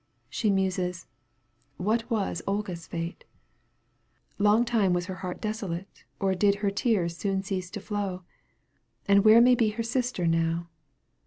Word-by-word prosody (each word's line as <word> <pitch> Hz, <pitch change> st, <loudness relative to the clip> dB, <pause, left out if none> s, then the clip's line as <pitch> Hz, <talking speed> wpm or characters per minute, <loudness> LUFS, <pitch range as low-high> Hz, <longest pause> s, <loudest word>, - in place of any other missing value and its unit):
She 220 Hz, -, 0 dB
muses: 185 Hz, -3 st, 0 dB, 0.4 s
" 120 Hz, +3 st, -42 dB
What 230 Hz, +2 st, +1 dB
was 210 Hz, -7 st, -1 dB
Olga's 195 Hz, -5 st, -3 dB
fate? 170 Hz, +1 st, -5 dB, 1.2 s
Longtime 210 Hz, -1 st, +3 dB
was 175 Hz, 0 st, 0 dB
her 185 Hz, 0 st, -6 dB
heart 180 Hz, -1 st, -5 dB
desolate 195 Hz, -4 st, -5 dB
Or 195 Hz, -1 st, +1 dB
did 200 Hz, +2 st, +3 dB
her 200 Hz, -, +2 dB
tears 200 Hz, -5 st, 0 dB
soon 195 Hz, +2 st, -1 dB
cease 185 Hz, -2 st, -3 dB
to -, -, -6 dB
flow? 200 Hz, -4 st, -4 dB, 0.8 s
And 200 Hz, 0 st, +5 dB
where 220 Hz, +2 st, +8 dB
may 250 Hz, +1 st, +6 dB
be 230 Hz, -3 st, +3 dB
her 230 Hz, -, 0 dB
sister 245 Hz, -5 st, -1 dB
now 165 Hz, +1 st, 0 dB
195 Hz, 145 wpm, -27 LUFS, 175-215 Hz, 1.2 s, where